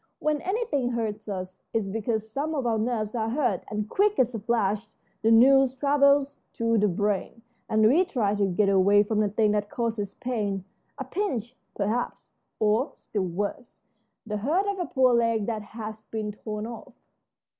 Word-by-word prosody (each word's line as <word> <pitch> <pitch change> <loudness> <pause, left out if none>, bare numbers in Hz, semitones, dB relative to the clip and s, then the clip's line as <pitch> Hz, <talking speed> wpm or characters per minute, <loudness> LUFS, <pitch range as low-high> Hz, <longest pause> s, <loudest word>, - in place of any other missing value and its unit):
When 300 -1 0
anything 370 - -1
hurts 220 -2 -3
us 185 -2 -5 0.2
it's 205 -3 0
because 220 0 -2
some 285 +8 -3
of 270 -4 -1
our 225 -2 +1
nerves 220 -2 -1
are 225 -2 -1
hurt, 240 - 0
and 210 0 -3
quick 410 - +2
as 250 -1 +2
a 225 - -3
flash 215 -1 0 0.3
the 225 - +3
news 260 +3 +6
travels 280 0 +3 0.2
to 230 -1 +1
the 210 - +3
brain, 205 +4 -1 0.3
and 215 0 +3
we 310 +11 +5
try 235 - 0
to 205 -1 +1
get 195 +2 +1
away 200 +1 +5
from 210 +1 -1
the 210 -1 +2
thing 210 +1 +2
that 205 0 -1
causes 220 -4 -3
pain 205 -6 -2 0.3
a 270 - -3
pinch, 260 - -3 0.2
perhaps, 220 +4 -2 0.3
or, 220 +6 +2
still 200 -3 -3
worse, 205 - -5 0.4
the 210 -1 -3
hurt 310 - +1
of 400 -1 -2
a 350 - -2
poor 260 -3 +3
leg 230 -3 +2
that 220 -1 -2
has 215 0 -8
been 215 -1 -3
torn 210 0 -6
off." 230 0 -9
225 Hz, 175 wpm, -26 LUFS, 210-260 Hz, 0.4 s, news